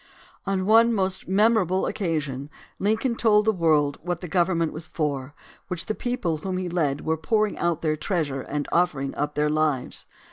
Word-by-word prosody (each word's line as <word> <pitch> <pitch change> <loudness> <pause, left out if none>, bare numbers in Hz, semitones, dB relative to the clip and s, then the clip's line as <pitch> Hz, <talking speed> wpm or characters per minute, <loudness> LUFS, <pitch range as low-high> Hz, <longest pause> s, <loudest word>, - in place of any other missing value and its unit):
On 190 -1 0
one 225 +3 +6
most 190 -3 -1
memorable 195 -2 +3
occasion 150 -7 -2 0.3
Lincoln 220 +5 +1
told 210 -2 +3
the 220 - +4
world 155 -6 +2
what 175 0 -3
the 180 - -7
government 170 -1 +1
was 155 +1 -7
for 145 -2 -3 0.3
which 180 -2 -3
the 215 - -1
people 215 -10 -2
whom 185 +4 -3
he 185 -1 -2
led 155 -5 0
were 160 0 +1
pouring 210 +6 +1
out 170 -1 0
their 155 -1 +1
treasure 150 -4 -2
and 145 +2 -4
offer 175 -4 +2
ing 135 0 -3
up 145 +1 -3
their 150 0 +1
lives. 155 -4 -1
170 Hz, 180 wpm, -25 LUFS, 150-195 Hz, 0.3 s, one